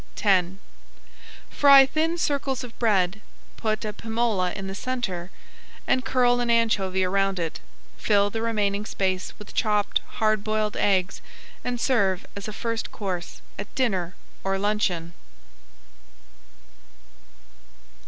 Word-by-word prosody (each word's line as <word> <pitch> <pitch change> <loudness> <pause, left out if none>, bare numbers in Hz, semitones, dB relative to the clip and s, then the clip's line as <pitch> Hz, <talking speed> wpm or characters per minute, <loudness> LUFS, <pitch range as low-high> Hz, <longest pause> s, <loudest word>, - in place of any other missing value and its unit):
X 190 -4 +4 1.0
Fry 275 -1 +8
thin 320 +5 0
circles 280 -5 -1
of 240 -2 -9
bread, 205 -3 +2 0.3
put 215 0 -2
a 210 - -3
pimola 220 -6 0
in 195 - -5
the 195 - -5
centre, 195 -6 -3 0.6
and 255 - +1
curl 245 -2 +3
an 240 -1 -1
anchovy 205 -5 +2
around 195 +1 +1
it. 165 -2 -3 0.4
Fill 205 -1 +2
the 225 - -3
remaining 210 -3 0
space 185 -3 -2
with 210 - -12
chopped 210 -3 +1 0.2
hard 215 -1 +2
boiled 215 0 -1
eggs 190 -2 +1 0.4
and 245 -1 -2
serve 200 -7 +1
as 200 0 -6
a - - -4
first 230 +1 -3
course 185 -4 -5 0.2
at - - -7
dinner 190 - 0 0.3
or 195 0 0
luncheon. 195 -5 -1
210 Hz, 125 wpm, -25 LUFS, 190-235 Hz, 1.0 s, Fry